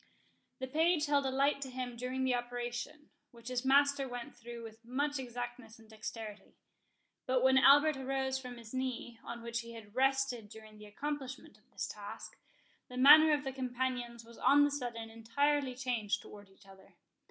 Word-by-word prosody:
The 260 Hz, -, -4 dB
page 315 Hz, +3 st, +2 dB
held 285 Hz, -2 st, +2 dB
a -, -, +1 dB
light 275 Hz, +2 st, +1 dB
to 270 Hz, -, -4 dB
him 250 Hz, -1 st, -5 dB
during 255 Hz, +2 st, -3 dB
the 260 Hz, -1 st, +2 dB
operation, 245 Hz, +4 st, -4 dB, 0.2 s
which 235 Hz, -1 st, -11 dB
his 250 Hz, 0 st, -1 dB
master 280 Hz, 0 st, +4 dB
went 245 Hz, -1 st, -7 dB
through 235 Hz, 0 st, -9 dB
with 225 Hz, 0 st, -11 dB
much 285 Hz, +4 st, -1 dB
exactness 245 Hz, -2 st, -6 dB
and 225 Hz, -1 st, -18 dB
dexterity. 215 Hz, -1 st, -8 dB, 0.7 s
But 255 Hz, -1 st, +2 dB
when 265 Hz, 0 st, +6 dB
Albert 290 Hz, +2 st, +6 dB
arose 265 Hz, 0 st, -1 dB
from 250 Hz, -2 st, -8 dB
his 230 Hz, -1 st, -12 dB
knee, 255 Hz, -3 st, -3 dB
on 235 Hz, 0 st, -7 dB
which 235 Hz, 0 st, -2 dB
he 235 Hz, 0 st, -8 dB
had 215 Hz, -3 st, -11 dB
rested 265 Hz, -4 st, +1 dB
during 215 Hz, 0 st, -13 dB
the 210 Hz, -, -11 dB
accomplishment 275 Hz, +3 st, -5 dB
of -, -, -34 dB
this -, -, -4 dB
task, -, -, -9 dB, 0.5 s
the 250 Hz, -, -8 dB
manner 310 Hz, +4 st, +9 dB
of 295 Hz, -1 st, +2 dB
the 270 Hz, -1 st, -4 dB
companions 250 Hz, -2 st, -3 dB
was 235 Hz, 0 st, -14 dB
on 290 Hz, +1 st, +6 dB
the 290 Hz, -, +2 dB
sudden 235 Hz, -5 st, -4 dB
entirely 260 Hz, +4 st, 0 dB
changed 245 Hz, -5 st, -1 dB
towards 205 Hz, -1 st, -12 dB
each 195 Hz, -, -22 dB
other. 190 Hz, -1 st, -17 dB
250 Hz, 180 wpm, -33 LUFS, 235-270 Hz, 0.7 s, manner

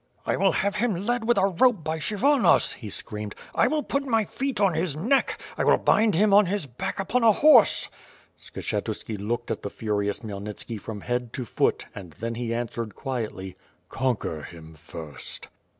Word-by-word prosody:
"I -, -, +1 dB
will -, -, +3 dB
have 200 Hz, +1 st, 0 dB
him 225 Hz, -2 st, +1 dB
led 225 Hz, +6 st, -1 dB
with 240 Hz, -, +3 dB
a 195 Hz, -, +4 dB
rope 200 Hz, 0 st, +3 dB
by 160 Hz, +1 st, -2 dB
Kshyvonos," 240 Hz, -, +3 dB
he 110 Hz, -, -8 dB
screamed. 105 Hz, +1 st, -6 dB, 0.2 s
"I -, -, +3 dB
will 300 Hz, +2 st, 0 dB
put 280 Hz, -, -1 dB
my 225 Hz, -6 st, +1 dB
feet 270 Hz, +4 st, -3 dB
on 195 Hz, -3 st, +3 dB
his 160 Hz, -2 st, -1 dB
neck; 235 Hz, -, +1 dB, 0.2 s
I -, -, +2 dB
will -, -, +5 dB
bind 215 Hz, -3 st, +3 dB
him 205 Hz, +3 st, +4 dB
on 205 Hz, -1 st, +6 dB
his 200 Hz, -3 st, -2 dB
back 125 Hz, +6 st, -5 dB
upon 245 Hz, +6 st, 0 dB
a 225 Hz, -, +7 dB
horse!" 265 Hz, -1 st, +6 dB, 0.5 s
Skshetu=ki 110 Hz, -, -4 dB
looked 120 Hz, +4 st, -3 dB
at -, -, -3 dB
the 100 Hz, -, -4 dB
furious 105 Hz, -2 st, -2 dB
Khmyelnitski 105 Hz, +1 st, -6 dB
from 105 Hz, -3 st, -7 dB
head 125 Hz, 0 st, -2 dB
to 130 Hz, -, -4 dB
foot, -, -, 0 dB
and 90 Hz, -5 st, -10 dB
then 115 Hz, +8 st, -4 dB
he 115 Hz, 0 st, -3 dB
answered 115 Hz, -2 st, -3 dB
quietly: 110 Hz, -8 st, -4 dB, 0.3 s
"Conquer 125 Hz, -12 st, -1 dB
him 80 Hz, +1 st, -11 dB
first." 75 Hz, -1 st, -8 dB
130 Hz, 180 wpm, -26 LUFS, -, 0.5 s, a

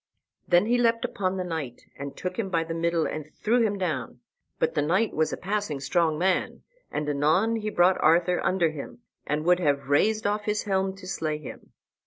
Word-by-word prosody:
Then 175 Hz, +3 st, +4 dB
he 240 Hz, +2 st, +2 dB
leapt 230 Hz, -1 st, +2 dB
upon 190 Hz, -1 st, -2 dB
the 185 Hz, -, -1 dB
knight, 160 Hz, -8 st, -5 dB
and 140 Hz, 0 st, -7 dB
took 180 Hz, +3 st, -4 dB
him 200 Hz, -4 st, -1 dB
by 165 Hz, -3 st, +1 dB
the 165 Hz, 0 st, -5 dB
middle 165 Hz, 0 st, 0 dB
and 155 Hz, 0 st, -5 dB
threw 235 Hz, +3 st, +2 dB
him 210 Hz, -3 st, +1 dB
down; 165 Hz, -9 st, -3 dB, 0.4 s
but -, -, 0 dB
the -, -, +1 dB
knight 185 Hz, +9 st, +1 dB
was 155 Hz, 0 st, +1 dB
a -, -, -3 dB
passing 195 Hz, -6 st, -2 dB
strong 160 Hz, +2 st, +1 dB
man, 185 Hz, +2 st, 0 dB, 0.3 s
and 150 Hz, 0 st, -2 dB
anon 160 Hz, +11 st, +2 dB
he 215 Hz, -1 st, -3 dB
brought 180 Hz, -2 st, +3 dB
Arthur 170 Hz, +3 st, +3 dB
under 175 Hz, -4 st, +2 dB
him, 155 Hz, +9 st, -9 dB, 0.3 s
and 150 Hz, +2 st, -1 dB
would 180 Hz, 0 st, +4 dB
have 140 Hz, -5 st, 0 dB
razed 215 Hz, +10 st, +2 dB
off 205 Hz, 0 st, 0 dB
his 210 Hz, 0 st, 0 dB
helm 190 Hz, -1 st, 0 dB
to 195 Hz, -1 st, -12 dB
slay 155 Hz, -5 st, -2 dB
him. 150 Hz, -, -11 dB
180 Hz, 205 wpm, -26 LUFS, 155-200 Hz, 0.4 s, Then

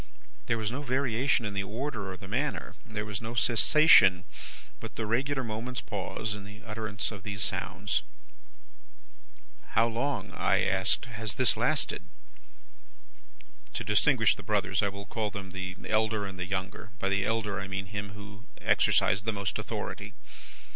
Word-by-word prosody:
There 115 Hz, -, +2 dB
was 110 Hz, -1 st, -2 dB
no 135 Hz, +4 st, -3 dB
variation 130 Hz, -2 st, +1 dB
in 105 Hz, -, -3 dB
the 100 Hz, -, 0 dB
order, 105 Hz, 0 st, -4 dB
or 95 Hz, -, -7 dB
the 95 Hz, -, -10 dB
manner. 135 Hz, +9 st, -2 dB
There 105 Hz, -2 st, -4 dB
was 105 Hz, -2 st, -4 dB
no 115 Hz, +1 st, -5 dB
cessation, 120 Hz, -, +6 dB, 0.6 s
but -, -, -8 dB
the 110 Hz, -, -2 dB
regular 130 Hz, +5 st, 0 dB
moment's 115 Hz, +3 st, -3 dB
pause, 105 Hz, +1 st, -3 dB
in 105 Hz, -1 st, -7 dB
the 105 Hz, +2 st, -11 dB
utterance 110 Hz, -2 st, -3 dB
of 100 Hz, -3 st, -8 dB
these 100 Hz, -2 st, -2 dB
sounds. -, -, -1 dB, 1.7 s
"'How 115 Hz, +1 st, +4 dB
long,' 130 Hz, +5 st, -2 dB
I -, -, +2 dB
asked, 95 Hz, +4 st, +3 dB
'has 110 Hz, -3 st, -4 dB
this 130 Hz, -3 st, +4 dB
lasted?' -, -, +1 dB, 1.7 s
"To -, -, -2 dB
distinguish -, -, +4 dB
the -, -, -10 dB
brothers, 95 Hz, +1 st, +1 dB
I 100 Hz, -, +2 dB
will 100 Hz, 0 st, -8 dB
call 105 Hz, +1 st, -2 dB
them 100 Hz, -2 st, -7 dB
the 95 Hz, 0 st, -5 dB
elder 110 Hz, -1 st, +1 dB
and 95 Hz, -1 st, -7 dB
the 90 Hz, -, -3 dB
younger; 95 Hz, +2 st, -4 dB
by 115 Hz, -, -1 dB
the 100 Hz, 0 st, +2 dB
elder, 105 Hz, -2 st, -1 dB
I 95 Hz, -, -5 dB
mean 95 Hz, 0 st, -3 dB
him 100 Hz, 0 st, -5 dB
who 100 Hz, -1 st, -11 dB
exercised 100 Hz, +3 st, +3 dB
the 110 Hz, -, +2 dB
most 100 Hz, -2 st, -2 dB
authority. -, -, -5 dB
105 Hz, 160 wpm, -29 LUFS, 100-115 Hz, 1.7 s, cessation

